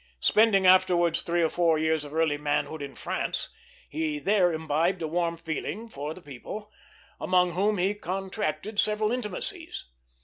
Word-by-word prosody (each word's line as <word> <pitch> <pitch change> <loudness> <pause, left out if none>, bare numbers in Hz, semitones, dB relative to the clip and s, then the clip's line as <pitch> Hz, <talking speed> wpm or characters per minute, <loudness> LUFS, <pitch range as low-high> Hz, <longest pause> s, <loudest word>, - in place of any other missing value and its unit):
Spending 210 -3 +4
afterwards 175 -2 +4
three 170 0 0
or 160 - +3
four 165 -2 +2
years 160 -1 +1
of 145 - -9
early 155 -2 +1
manhood 150 +1 -1
in 140 -1 -7
France, - - -2 0.4
he 315 -1 -2
there 200 -9 +3
imbibed 160 +3 0
a - - -1
warm 170 +1 -1
liking 205 +7 -4
for 150 -2 -5
the 185 - -13
people, 205 - -8 0.5
among 180 -1 +3
whom 200 +4 +1
he 190 +3 +1
contracted 195 0 -3
several 215 0 +2
intimacies. 250 - -4
175 Hz, 150 wpm, -27 LUFS, 160-210 Hz, 0.5 s, Spending